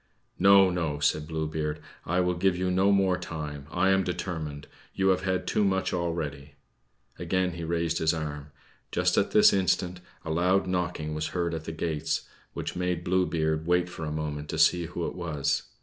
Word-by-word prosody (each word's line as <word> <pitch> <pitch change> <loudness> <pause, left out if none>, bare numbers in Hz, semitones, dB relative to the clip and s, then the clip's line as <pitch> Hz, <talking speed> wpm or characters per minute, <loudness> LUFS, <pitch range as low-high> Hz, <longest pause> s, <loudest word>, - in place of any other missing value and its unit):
"No, 100 -1 +7
no," 80 -5 -2
said 75 +1 +1
Blue 80 -1 -2
Beard; 75 0 -3 0.3
"I 90 +2 +2
will 90 0 +1
give 90 +1 +1
you 90 0 0
no 95 +2 +3
more 95 -2 +3
time, 75 -5 -6
I 95 - +2
am 95 0 +3
determined. 80 -5 -4 0.3
You 95 0 +2
have 95 -1 +3
had 95 -1 -1
too 105 - +1
much 95 -1 +1
already." 75 -5 -3 0.6
Again 95 -1 0
he 85 0 -6
raised 85 0 -1
his 80 -1 +3
arm. 75 -3 -4 0.4
Just - - +2
at - - +2
this - - +6
instant 90 -2 +1 0.3
a 80 - -3
loud 90 +4 +2
knocking 90 -4 -2
was 75 0 -2
heard 85 -1 0
at 80 -1 -5
the - - -4
gates, 80 -2 -2 0.3
which - - -5
made 90 -1 -1
Blue 90 +1 +2
Beard 80 -1 -1
wait 90 0 +2
for 85 - -7
a 75 - -3
moment 75 -1 -4
to - - -3
see 85 -1 +4
who 85 0 -4
it - - -3
was. 80 -6 -2
85 Hz, 195 wpm, -28 LUFS, 80-90 Hz, 0.6 s, No